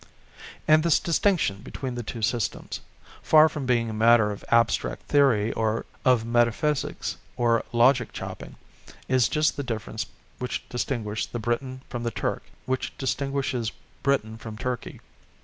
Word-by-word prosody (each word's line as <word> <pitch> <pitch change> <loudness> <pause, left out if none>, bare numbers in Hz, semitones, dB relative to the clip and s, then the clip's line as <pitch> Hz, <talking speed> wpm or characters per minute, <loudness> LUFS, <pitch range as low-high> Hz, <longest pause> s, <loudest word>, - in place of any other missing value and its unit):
And 155 0 +6
this 170 -1 +4
distinction 170 - +1
between 130 -3 -5
the 120 - -4
two 115 0 -6
systems, 115 -2 -1 0.4
far 155 0 +7
from 145 -4 -5
being 120 -2 +2
a 110 - -4
matter 110 -1 +5
of 100 - -7
abstract 115 0 +2
theory 120 -7 +3 0.5
of 125 -3 +4
metaphysics 120 +5 0 0.2
or 115 -1 +2
logic 120 0 +4
chopping, - - -7 0.5
is 130 -2 +3
just 155 0 +1
the 140 - -2
difference 110 -2 -4 0.3
which 125 - -4
distinguishes 115 -4 -2
the - - -5
Briton 125 +3 -2
from 120 - -5
the 120 - -1
Turk, - - -2 0.2
which 130 0 -2
distinguishes 135 -4 -1 0.3
Britain 110 -5 0
from 110 -1 -8
Turkey. 125 +1 -4
120 Hz, 140 wpm, -26 LUFS, 115-135 Hz, 0.5 s, far